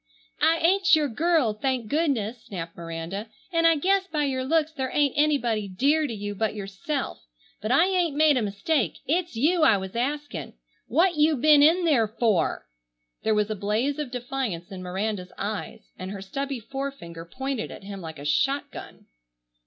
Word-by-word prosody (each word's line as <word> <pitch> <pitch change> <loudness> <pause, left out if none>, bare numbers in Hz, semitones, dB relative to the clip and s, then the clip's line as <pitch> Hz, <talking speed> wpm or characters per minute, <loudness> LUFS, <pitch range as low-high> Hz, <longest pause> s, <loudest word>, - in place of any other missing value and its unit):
"I 320 +2 +4
ain't 365 0 +5
your 305 -2 +1
girl, 290 -2 +2
thank 255 0 -2
goodness!" 250 -6 -1
snapped 170 -4 -6
Miranda, 170 +5 -6 0.2
"and 330 0 +4
I 330 - +5
guess 385 +5 +1
by 305 -4 -1
your 260 -2 -1
looks 315 +3 +1
there 265 -4 -3
ain't 290 -2 +2
anybody 255 -8 +1
'dear' 285 +11 +2
to 235 - -5
you 205 0 -4
but 215 +1 -1
yourself. 200 - -4 0.3
But 215 +3 -2
I 275 +7 +5
ain't 360 -5 +1
made 305 -1 +5
a 250 - +1
mistake. 210 - 0
It's 340 0 -1
you 320 +9 +2
I 225 -9 +6
was 190 +1 -7
asking. 255 - -3 0.3
What 340 +5 +2
you 305 +1 +4
bin 295 +2 +6
in 335 +4 +5
there 255 -9 +3
for?" 210 - 0 0.6
There 220 -1 +1
was 210 0 +1
a - - -1
blaze 220 +9 -1
of 295 -4 -3
defiance 245 -7 -4
in 190 -1 -7
Miranda's 185 +1 -3
eyes, 215 +2 -5
and 185 - -5
her 195 0 -6
stubby 275 +6 -4
forefinger 270 -10 -6
pointed 265 +7 -4
at - - -10
him 195 -1 -7
like 160 -2 -8
a 140 - -9
shotgun. 270 - -2
255 Hz, 175 wpm, -26 LUFS, 205-300 Hz, 0.6 s, I